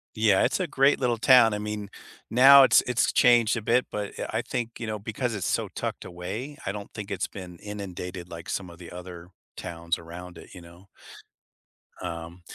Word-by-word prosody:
Yeah. 110 -3 +3
It's - - +1
a 185 - -1
great 140 0 +3
little 120 -3 +1
town. 120 -2 +6
I 105 - -2
mean, 105 -1 -5 0.4
now 135 +3 +8
it's - - +6
it's 125 -1 +1
changed 120 -1 +5
a 115 - -3
bit, 120 +4 +2
but, 105 -1 -5
yeah, - - -4
I - - 0
think, 120 -1 -4
you 115 - -4
know, 105 -1 -3
because 115 +2 -3
it's 95 - -3
so - - 0
tucked - - -5
away, 100 +11 -6
I 95 - -1
don't 100 0 -8
think 105 -1 -7
it's 95 - -2
been 90 -3 -10
inundated 90 -3 -7
like 85 0 -9
some 95 -3 -3
of 85 +1 -14
the 85 -1 -11
other 90 -1 -9 0.3
towns 85 0 -3
around 85 +1 -10
it, - - -13
you 90 - -10
know. 85 +3 -16 1.1
Um 85 +1 -7
100 Hz, 200 wpm, -26 LUFS, 90-115 Hz, 1.1 s, now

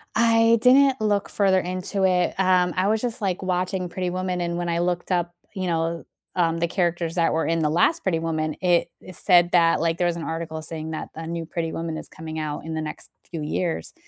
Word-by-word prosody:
I 230 0 +5
didn't 265 0 +5
look 205 -2 +1
further 190 -2 +3
into 185 +2 -2
it. 180 -1 +2
Um, 180 -2 +3
I 185 +2 +1
was 220 +1 +1
just 240 -1 -2
like 190 -1 -1
watching 185 0 -1
Pretty 180 0 -3
Woman, 180 0 -2
and 170 0 -2
when 175 -1 -2
I 170 0 0
looked 175 +1 -1
up, 175 -1 0 0.2
you 185 -2 -3
know, 165 0 -1 0.3
um, 165 -2 +1
the 170 0 0
characters 170 -2 -1
that 165 -3 +2
were 160 - 0
in 165 0 +1
the 150 -1 +1
last 175 - +2
Pretty 165 -4 +1
Woman, 155 -1 -1
it 175 -2 +2
eh - - -13
it 185 - -8
said 175 -2 +4
that, 170 -1 +4
like, 165 +1 0
there 175 - +1
was 170 - 0
an 165 - -5
article 160 -1 -4
saying 160 0 -5
that 155 - -5
a 160 0 -6
new 165 -1 -4
Pretty 165 0 -3
Woman 165 -1 -4
is - - -5
coming 160 0 -7
out 150 0 -4
in 160 - -5
the 160 - -2
next 155 - -6 0.2
few 165 -3 -5
years. 165 +2 -2
175 Hz, 235 wpm, -24 LUFS, 165-185 Hz, 0.3 s, I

